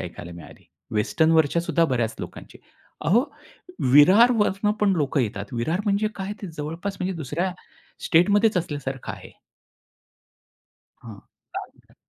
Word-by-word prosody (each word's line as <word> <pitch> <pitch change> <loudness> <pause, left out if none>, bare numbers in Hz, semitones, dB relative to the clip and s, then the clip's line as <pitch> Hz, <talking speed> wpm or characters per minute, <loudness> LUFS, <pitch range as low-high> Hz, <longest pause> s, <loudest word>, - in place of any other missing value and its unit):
ऐकायला 85 0 -8
मिळाली. 85 - -13 0.3
वेस्टर्नवरच्या 160 +8 +2
सुद्धा 170 -1 +1
बऱ्याच 120 -6 -1
लोकांची. - - -10 0.5
अहो 220 - +4 0.7
विरारवरून 210 - +5
पण 200 -2 +3
लोकं 145 -2 0
येतात. 105 -3 -3
विरार 155 - -1
म्हणजे 205 +1 +1
काय 195 +1 -4
ते - - -4
जवळपास 165 +7 -5
म्हणजे 185 +1 -2
दुसऱ्या 165 +5 -2 0.5
स्टेटमध्येच 205 +5 +3
असल्यासारखं 145 -6 -4
आहे. - - -11 1.7
हां. 110 -4 -10 0.3
पालघर. - - -10
165 Hz, 115 wpm, -24 LUFS, 135-200 Hz, 1.7 s, विरारवरून